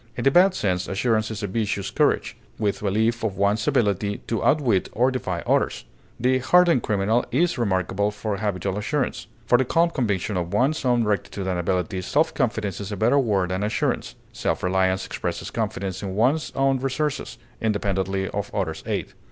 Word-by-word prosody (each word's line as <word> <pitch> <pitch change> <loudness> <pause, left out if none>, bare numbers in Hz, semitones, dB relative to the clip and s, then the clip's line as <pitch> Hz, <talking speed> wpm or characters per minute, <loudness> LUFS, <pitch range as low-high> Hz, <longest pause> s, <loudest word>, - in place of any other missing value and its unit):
In 120 - -2
the 135 - +4
bad 185 +4 +5
sense, 90 - -1
assurance 110 +2 0
is 110 -1 -5
a - - 0
vicious 100 -1 -2
courage, - - +1 0.2
with 100 -3 -1
belief 110 +4 0
of 105 -4 -2
one's 100 +2 +1
ability 100 -2 +1
to 115 - -2
outwit 125 -11 +2
or 125 +3 +2
defy 95 -9 -3
others; - - 0 0.3
the 130 +2 +2
hardened 175 +1 +4
criminal 110 +4 +1
is 160 +4 +1
remarkable 100 -1 0
for 105 0 -3
habitual 100 -1 -2
assurance. 135 +6 -2 0.2
For 120 +2 +4
the - - +4
calm 170 +6 +2
conviction 105 - -1
of 90 +2 -2
one's 135 +8 +1
own 120 -2 +3
rectitude 100 -2 -2
and 90 -2 -1
ability, 90 +2 -1
self 155 - +1
confidence 110 - -1
is 100 +1 -6
a 105 - -3
better 120 +8 +3
word 100 -8 +1
than 95 +1 -1
assurance; 105 +1 -1 0.2
self - - -2
reliance 95 0 +1
expresses - - -4
confidence 95 -1 -3
in 95 -2 -4
one's 130 +9 +1
own 135 -1 +2
resources, 135 -1 -2 0.2
independently 95 -3 -1
of 100 0 -4
others' 90 -6 -2
aid. - - -3
105 Hz, 175 wpm, -24 LUFS, 95-125 Hz, 0.3 s, bad